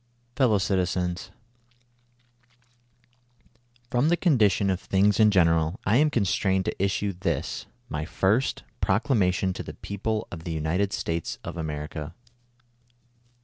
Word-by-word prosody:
"Fellow 125 -5 +3
Citizens: 90 -2 -1 1.5
— 120 0 -37
From 125 +5 +2
the 175 - +3
condition 105 - +3
of 95 - -1
things 100 +3 +2
in 110 -1 +7
general, 85 -3 +2
I 105 +5 +4
am 150 +2 +4
constrained 95 -5 +1
to - - -2
issue 100 +1 0
this, 85 -5 -3 0.2
my 75 0 -3
firsts 105 - +1 0.2
Proclama 105 -2 +2
tion 95 +1 -1
to - - -6
the - - -8
people 110 +2 -3
of 80 -2 -7
the 85 - -4
United 85 +6 0
States 85 -4 -3
of - - -6
America. 75 0 -5
100 Hz, 130 wpm, -26 LUFS, 85-120 Hz, 1.5 s, in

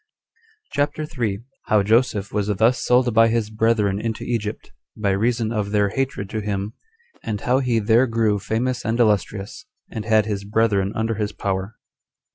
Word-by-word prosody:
CHAPTER 145 +2 -1
3. 115 -10 -3 0.2
How 105 -2 +3
Joseph 110 -1 +1
Was 105 -1 0
Thus 110 +4 +2
Sold 125 -1 +3
By 115 +1 +6
His 115 -2 -1
Brethren 110 -3 +1
Into 115 -1 -3
Egypt, 110 -3 -4 0.3
By 105 -2 0
Reason 115 +3 0
Of 105 -3 -1
Their 105 -1 +2
Hatred 135 -3 -2
To 110 - -2
Him; 100 0 -3 0.5
And 105 -2 -3
How 125 +2 +2
He 125 -3 +1
There 115 +4 +3
Grew 110 -3 +1
Famous 120 +5 -2
And 115 +2 -1
Illustrious 105 - 0 0.2
And 110 - -4
Had 110 -2 +3
His 100 -2 -3
Brethren 100 -2 +1
Under 110 +1 0
His 105 -1 -3
Power. 95 +2 -3
110 Hz, 165 wpm, -22 LUFS, 105-115 Hz, 0.5 s, By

